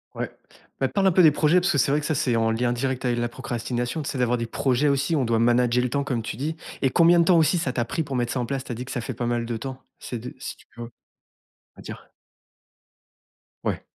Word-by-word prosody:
Ouais, - - -4 0.5
bah, 135 - +2
parle 195 +9 +1
un - - +5
peu 180 +1 +5
des 155 - +8
projets 155 +4 +3
parce 185 +2 +1
que - - +1
c'est 135 - +2
vrai 150 - +3
que 150 - -5
ça 155 - 0
c'est 120 -3 +1
en 115 0 +2
lien 120 +2 0
direct 130 +1 -2
avec 120 -1 0
la 120 0 0
procrastination, 120 +2 -3
tu 140 - -4
sais? 135 - -4
D'avoir 125 -1 +1
des 115 - -2
projets 130 +4 +1
aussi 140 +3 +1
où 150 - +2
on 130 - +1
doit 115 -1 +1
«manager 120 +1 +3
le 125 - -1
temps», 140 +2 -1
comme 120 -3 -1
tu 110 - -6
dis, 155 +4 -3 0.3
et 135 - +3
combien 170 +4 +5
de 170 - +4
temps 175 0 +5
aussi 160 +3 +3
ça 135 -6 -1
t'a 120 - 0
pris 160 +8 -3
pour 140 -2 -5
mettre 120 -1 0
ça 130 - -2
en 120 - -1
place? 135 +1 -3
Tu - - -8
as - - -3
dit 125 +3 -6
que - - -8
ça 125 - -2
fait - - -5
pas 120 - -4
mal 120 0 -1
de 115 -1 -3
temps, 130 +2 -7 0.2
c'est 120 - -5
de 125 - -8
si - - -6
tu - - -22
peux 120 -1 -8 0.9
dire. - - -10 1.5
Ouais. - - -2
125 Hz, 280 wpm, -24 LUFS, 120-145 Hz, 1.5 s, des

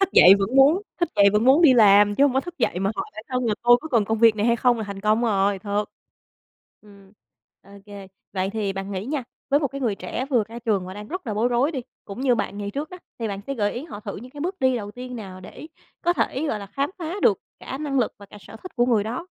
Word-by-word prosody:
Thức 390 - +3
dậy 190 +2 +9
vẫn 210 +7 -1
muốn 300 +9 +5 0.2
thức 345 - +2
dậy 200 0 +6
vẫn 210 +2 +2
muốn 275 +6 +5
đi 270 -6 +7
làm, 205 -2 +6
chứ 280 - +4
hông 275 - +3
có 265 - +3
thức 350 +4 -10
dậy 180 - 0
mà 195 +1 0
hỏi - - -2
bản 215 - -9
thân 255 -1 -1
là 215 - +1
"Tôi 240 0 +7
có 315 - -8
cần 230 -7 +2
công 220 +2 -1
việc 225 -1 +5
này 210 +2 0
hay 235 0 +3
không?" 240 -1 +2
là 220 - -3
thành 200 -1 -7
công 215 +3 +2
rồi, 200 -3 +1
thật. 205 +1 -2 1.0
Ừm, 200 -2 -19 0.5
ô 195 - -20 0.2
kê. 200 -2 -10 0.2
Vậy 190 0 -1
thì 210 -3 -2
bạn 195 +1 -6
nghĩ 190 +1 -4
nha, 280 -3 -3 0.3
với 285 +2 +4
một 280 - 0
cái 275 +1 -7
người 225 -6 0
trẻ 255 +5 -5
vừa 235 -5 +2
ra 230 - -8
trường 215 -6 -1
và 185 - -8
đang 210 +1 -9
rất 365 -4 -6
là 215 - -2
bối 230 +4 +1
rối 250 +6 +1
đi, 265 - -3 0.2
cũng 200 +5 -8
như 255 -3 +3
bạn 205 - -3
ngày 205 0 -4
trước 295 +7 -5
đó, 365 - -9 0.2
thì 225 -2 -3
bạn 200 -1 -5
sẽ 275 - -3
gợi 205 -4 0
ý 255 +6 -6
họ 210 -11 -9
thử 205 -1 -7
những 250 +5 -10
cái 290 - -9
bước 365 +5 -3
đi 260 -1 +2
đầu 205 -3 -5
tiên 250 +2 -8
nào 190 -4 -9
để 190 +11 -11 0.4
có 345 0 +3
thể, 310 -3 -1
gọi 215 - -1
là, 200 - -8
khám 275 +7 -2
phá 335 0 -4
được - - +4 0.2
cả 265 - -6
năng 280 -3 -2
lực 235 - +1
và 200 - -13
cả 205 - -14
sở 225 - -12
thích 370 - -11
của 240 0 +3
người 225 -5 +2
đó? 245 +10 -5
230 Hz, 290 wpm, -23 LUFS, 205-270 Hz, 1.0 s, dậy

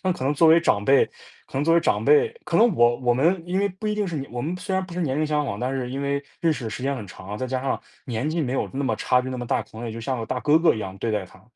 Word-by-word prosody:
那 185 -1 +2
可 170 - -5
能 140 +2 +1
作 160 +3 +5
为 165 +1 +7
长 105 -11 +1
辈 135 +4 +5 0.4
可 - - -23
能 140 - +1
作 165 - +3
为 170 - +5
长 - - +1
辈 445 +1 +5 0.2
可 - - 0
能 230 -4 +5
我 120 -3 +4
我 120 -2 +1
们 165 +7 +2
因 180 +2 -1
为 200 +1 +2
不 190 +3 -7
一 210 - 0
定 210 -1 -1
是 170 -3 -4
年 140 -1 -5
我 120 0 -3
们 165 +5 -2
虽 190 +2 -4
然 190 0 0
不 180 - -11
是 180 - -3
年 140 -6 0
龄 155 - +1
相 150 -1 0
仿， 100 -5 -4
但 125 +2 -1
是 130 -2 -2
因 135 +2 -3
为， 140 0 -1 0.2
认 165 -1 +3
识 140 - -6
的 - - -2
时 125 - -6
间 140 +1 0
很 110 -6 -6
长， 95 +2 -8
再 130 - -2
加 130 0 -2
上， 135 - -1 0.2
年 125 +4 -2
纪 165 +2 -1
没 125 - -2
有 135 - -1
那 140 +1 -1
么 - - +1
差 125 0 +2
别 130 - -5
那 130 - -4
么 120 - -5
大， - - 0
可 - - -23
能 120 - -5
也 115 - -4
就 115 - -7
像 130 +2 -2
个 115 - -4
大 130 - -2
哥 150 +4 +4
哥 165 0 +4
一 110 - -4
样 95 -2 -6
对 115 - -2
待 105 -3 -1
他。 95 +1 -18
135 Hz, 385 characters per minute, -24 LUFS, 120-170 Hz, 0.4 s, 为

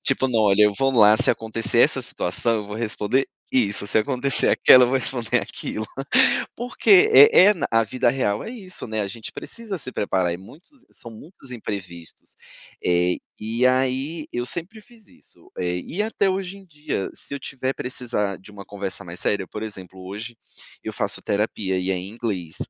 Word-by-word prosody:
Tipo: 135 0 +1
"não, 115 -3 +1
olha, 105 0 +5
eu 105 - +3
vou 135 0 +2
lá, 110 -3 +6
se - - +4
acontecer 115 0 -2
essa - - +3
situação, 110 +6 -1
eu 105 - -4
vou 105 +1 -7
responder 115 +3 -1 0.3
isso, 105 -5 0
se 110 - +1
acontecer 130 +3 0
aquela, 130 - +7
eu - - 0
vou 135 - +2
responder 120 -3 -1
aquilo". 110 0 -6 0.7
Porque 365 - +4
é 435 - +8
é 210 - +4
na 175 - -2
a 115 0 +3
vida 120 +3 0
real 115 -5 0
é - - -6
isso, 195 - -7
né, 110 -1 -3
a 100 - -3
gente 110 +3 -7
precisa 225 -4 -7
se 130 - -7
preparar 95 -5 0
e - - -4
muitos 145 - -16 0.2
são 115 - -12
muitos 135 - -13
imprevistos. 95 -8 -8 0.5
Eh, 90 0 +2 0.2
e 115 +4 0
aí 130 +5 0
eu 120 0 -2
sempre 185 - -2
fiz 225 -2 -21
isso. - - -19
Eh, 90 0 -2
e 195 +6 -3
até 205 -3 0
hoje 190 0 -4
em 195 - -16
dia, 150 - -4
se 140 - -8
eu - - -4
tiver 130 0 -3
precisar 120 -6 -3
de 95 - -15
uma 100 -1 -10
conversa 100 -2 -6
mais 85 0 -8
séria, 100 -3 -1
por 105 - -7
exemplo, 95 -3 -9
hoje, 110 +5 -7 0.5
eu - - -4
faço - - -2
terapia 100 -2 -1
e 90 +1 -2
é 95 - +1
em 90 +1 -5
inglês, 100 -8 -4
115 Hz, 195 wpm, -23 LUFS, 100-135 Hz, 0.7 s, é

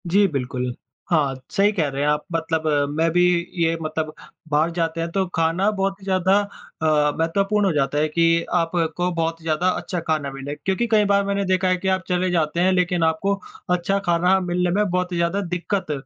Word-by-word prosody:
जी, 200 +4 +4
बिल्कुल। 125 -5 -3 0.4
हाँ, 145 -5 +2 0.2
सही 200 +1 +3
कह 170 -8 0
रहे 135 0 -4
हैं 145 - +1
आप। 150 0 +1
मतलब 160 -1 -1 0.3
मैं 165 +1 +3
भी 175 +2 +3 0.4
ये 165 0 +2
मतलब 155 0 -3 0.4
बाहर 150 +3 +2
जाते 165 -1 -2
हैं, 165 - -2
तो 195 +1 0
खाना 165 +5 +2
बहुत 195 -1 -2
ही - - -17
ज़्यादा 190 +1 +3
अ, 155 -6 -1
महत्वपूर्ण 195 +5 +1
हो 190 - +2
जाता 145 0 0
है 155 +1 +2
कि 165 +1 +2
आपको 170 0 0
बहुत 165 0 -2
ज़्यादा 160 +2 0
अच्छा 180 -1 -2
खाना 155 -3 0
मिले। 135 +2 -6
क्योंकि 190 +10 -1
कई 210 -1 +4
बार 200 0 +3
मैंने 200 0 0
देखा 185 0 +1
है 185 0 +2
कि 190 - -4
आप 190 -1 +1
चले 180 0 0
जाते 165 -1 0
हैं, 185 +2 +3
लेकिन 180 -2 +1
आपको 160 +5 +1 0.4
अच्छा 180 +2 +1
खाना 180 +2 +3
मिलने 180 -1 0
में 210 -1 +1
बहुत 180 0 -1
ही 175 - -2
ज़्यादा 170 +4 0
दिक्कत 180 -1 -2
170 Hz, 200 wpm, -22 LUFS, 160-190 Hz, 0.4 s, जी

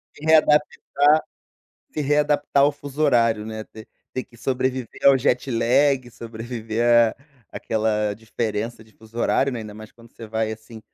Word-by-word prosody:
Se 145 - -14
readaptar 155 -1 +5 1.3
se - - -3
readaptar 145 -1 +2
ao 145 - +3
fuso 145 +1 -6
horário, 115 -6 +2
né, 110 0 -6
ter 110 0 -13 0.3
ter 130 - -3
que 120 - -21
sobreviver 130 0 -3
ao 140 -1 +7
jet-lag, 130 +1 +1
sobreviver 115 0 -5 0.3
a - - -15 0.4
aquela 105 -1 -1
diferença 115 +1 -4
de 110 0 -22
fuso 110 +1 -18
horário, 135 +3 +1
né, 120 - -4
ainda 105 -1 -9
mais 110 0 -12
quando 115 0 -19
você 115 - -11
vai, 110 0 -2
assim, 110 +1 -11
115 Hz, 155 wpm, -22 LUFS, 110-135 Hz, 1.3 s, ao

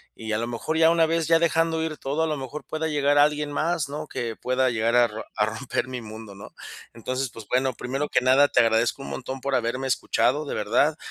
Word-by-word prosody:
Y 110 -1 -6
a - - +1
lo 115 +1 -2
mejor 120 +7 -3
ya 160 0 +6
una 165 -1 +4
vez 165 -1 0
ya 165 0 +5
dejando 165 -1 +1
ir 160 -2 -4
todo, 145 +4 -2
a - - +1
lo 155 -1 -2
mejor 135 +2 -7
pueda 160 0 -3
llegar 145 -1 +2
alguien 150 0 +3
más, 155 0 -1
¿no? 150 +2 -5
Que 120 -5 -4
pueda 130 0 +1
llegar 115 0 0
a 120 -1 +6
ro 110 0 -8
a 105 - +2
romper 110 +4 -3
mi 125 -1 -5
mundo, 110 -2 -10
¿no? 100 - -12 0.4
Entonces, 130 +3 -3
pues 115 -2 -11
bueno, 130 +1 +1
primero 135 +5 -3
que 125 - +2
nada 130 +3 +5
te - - +3
agradezco 115 +3 +1
un - - -7
montón 130 0 -6
por 140 +1 -2
haberme 125 +2 -1
escuchado, 145 +3 +1
de - - -4
verdad, 125 +9 +1
135 Hz, 240 wpm, -25 LUFS, 120-150 Hz, 0.4 s, ya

